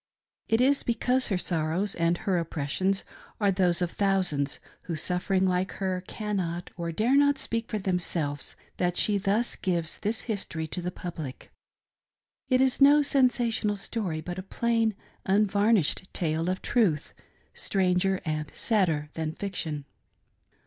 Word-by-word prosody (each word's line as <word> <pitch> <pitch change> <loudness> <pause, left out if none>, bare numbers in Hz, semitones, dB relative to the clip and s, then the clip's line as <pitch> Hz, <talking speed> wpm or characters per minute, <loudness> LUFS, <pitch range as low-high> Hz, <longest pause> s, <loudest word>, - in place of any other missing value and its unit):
It 225 +2 +3
is 275 +2 +4
because 250 +2 +1
her 195 - 0
sorrows 175 +3 -1
and 170 +1 +1
her 190 -3 0
oppressions 165 +4 -1 0.4
are 200 -2 +3
those 180 -2 +2
of 175 - -2
thousands, 185 -8 +1 0.3
who, 170 - -3
suffering 180 +4 0
Hke 185 0 +1
her, 185 -2 -2
cannot 185 -5 -3
or 170 -1 -3
dare 225 +10 +2
not 285 0 +4
speak 230 -4 -2
for 215 - -1
themselves, 175 -6 -2 0.2
that 175 -1 0
she 205 -1 +2
thus 205 +5 +1
gives 170 -3 -1
this 220 +2 -1
history 185 -7 -3
to 180 - -4
the 175 - -2
public. 165 -7 -7 1.0
It 255 -1 +4
is 265 +1 +2
no 290 +2 +7
sensational 240 -6 +2
story, 195 -5 -3
but. 175 +3 -5
a - - -3
plain, 225 +2 0 0.3
unvarnished 200 -2 +2
tale 165 0 0
of 185 - -2
truth, 180 - +1 0.4
stranger 190 0 +1
and 155 -1 -2
sadder 165 -9 +1
than 160 -1 -3
fiction. 160 -7 -3
190 Hz, 140 wpm, -28 LUFS, 170-215 Hz, 1.0 s, no